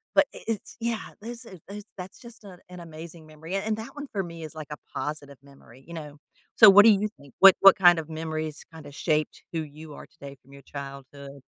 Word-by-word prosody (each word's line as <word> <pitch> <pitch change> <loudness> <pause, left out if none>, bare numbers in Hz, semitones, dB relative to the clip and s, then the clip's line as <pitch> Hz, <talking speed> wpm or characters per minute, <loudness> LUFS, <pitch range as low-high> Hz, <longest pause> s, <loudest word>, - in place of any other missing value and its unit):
but - - +6
i - - -9
it's 225 -2 -5
yeah, 230 -1 -2 0.2
there's 235 +3 -8
a 190 -5 -12
there's 205 +1 -8
that's 185 +1 -9
just 235 -2 -15
an 185 -3 -12
an 180 0 -10
amazing 165 0 -11
memory, 155 +4 -8
a - - +1
and 215 +1 -1
that 220 +1 -8
one 290 0 -7
for 195 -2 -1
me 170 -2 -9
is, 155 0 -9
like, 155 -2 -8
a 150 - -6 0.2
positive 145 -2 -5
memory, 135 -2 -18
you 170 - -10
know? 150 -3 -8 0.4
So, 220 - +10
what 205 +2 +8
do 225 - +9
you 210 +1 +1
think? 140 -2 -17
What 195 -1 +9
what 195 0 +9
kind 175 -3 +6
of 155 - -7
memories 155 -1 -5
kinda 150 -3 -11
shaped 155 0 -1
who 165 - -1
you 155 +1 -12
are - - -11
today 140 0 -12
from 135 +2 -19
your 140 - -13
childhood? 140 0 -10
160 Hz, 235 wpm, -26 LUFS, 145-195 Hz, 0.4 s, So